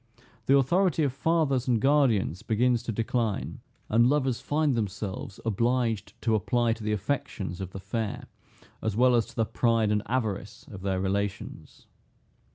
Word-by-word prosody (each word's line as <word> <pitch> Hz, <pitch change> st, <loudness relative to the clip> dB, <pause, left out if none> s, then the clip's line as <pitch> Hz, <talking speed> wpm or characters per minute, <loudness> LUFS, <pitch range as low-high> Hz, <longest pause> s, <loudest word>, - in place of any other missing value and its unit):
The 140 Hz, -, +6 dB
authority 165 Hz, +4 st, +2 dB
of 140 Hz, -3 st, 0 dB
fathers 140 Hz, -3 st, +1 dB
and 120 Hz, -3 st, +2 dB
guardians 120 Hz, -, +2 dB
begins 115 Hz, +2 st, +1 dB
to 120 Hz, -, -4 dB
decline, 115 Hz, -1 st, -2 dB, 0.3 s
and 120 Hz, +3 st, +4 dB
lovers 135 Hz, -4 st, +1 dB
find 150 Hz, -1 st, +1 dB
themselves 100 Hz, -3 st, -4 dB
obliged 115 Hz, -1 st, 0 dB
to 115 Hz, -, +2 dB
apply 115 Hz, +2 st, +1 dB
to 110 Hz, -1 st, -9 dB
the 105 Hz, -, -1 dB
affections 100 Hz, -4 st, -3 dB
of 95 Hz, -, -4 dB
the 95 Hz, -, -8 dB
fair, 105 Hz, +2 st, -4 dB, 0.6 s
as 110 Hz, -2 st, -2 dB
well 125 Hz, +1 st, +5 dB
as 115 Hz, -3 st, +2 dB
to -, -, -15 dB
the 115 Hz, -, +1 dB
pride 115 Hz, -2 st, +1 dB
and 105 Hz, 0 st, +2 dB
avarice 110 Hz, -1 st, -3 dB
of 95 Hz, -3 st, -9 dB
their 95 Hz, -1 st, -1 dB
relations. 100 Hz, +1 st, -4 dB
115 Hz, 160 wpm, -27 LUFS, 105-130 Hz, 0.6 s, The